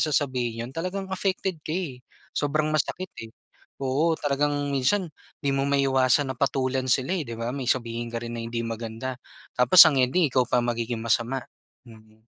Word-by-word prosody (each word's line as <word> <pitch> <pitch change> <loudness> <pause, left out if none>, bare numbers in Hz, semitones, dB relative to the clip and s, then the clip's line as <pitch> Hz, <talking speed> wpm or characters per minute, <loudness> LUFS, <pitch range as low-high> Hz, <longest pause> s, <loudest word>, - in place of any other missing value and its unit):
sasabihin 130 -6 0
'yon - - -10
talagang 185 +3 -3
affected 190 -2 -1
ka - - -7
eh, 155 -8 -4 0.3
sobrang 155 +1 0
masakit 180 +5 -1 0.2
eh. 115 - -9 0.5
Oo, 150 +5 +1
talagang 145 0 0 0.2
minsan 175 +9 +2 0.3
hindi 140 - -1
mo 135 - +1
maiwasan 135 -1 +2
na - - -24
patulan 130 -1 0
sila 130 +8 +2
eh, 180 - -1
'di 115 - -6
ba? 120 +3 -3
May 130 -3 -1
sabihin 115 -1 -2
ka 115 - -3
rin 120 0 -5
na 115 - -4
hindi 115 0 -3
maganda 115 +3 -5 0.4
tapos 125 +8 +3
ang 155 - +3
ending 155 +7 +3
ikaw 130 - +4
pa - - +2
magiging 120 -1 -2
masama, 120 +3 +1 0.5
mm. 110 -1 -18
130 Hz, 175 wpm, -25 LUFS, 120-150 Hz, 0.5 s, ikaw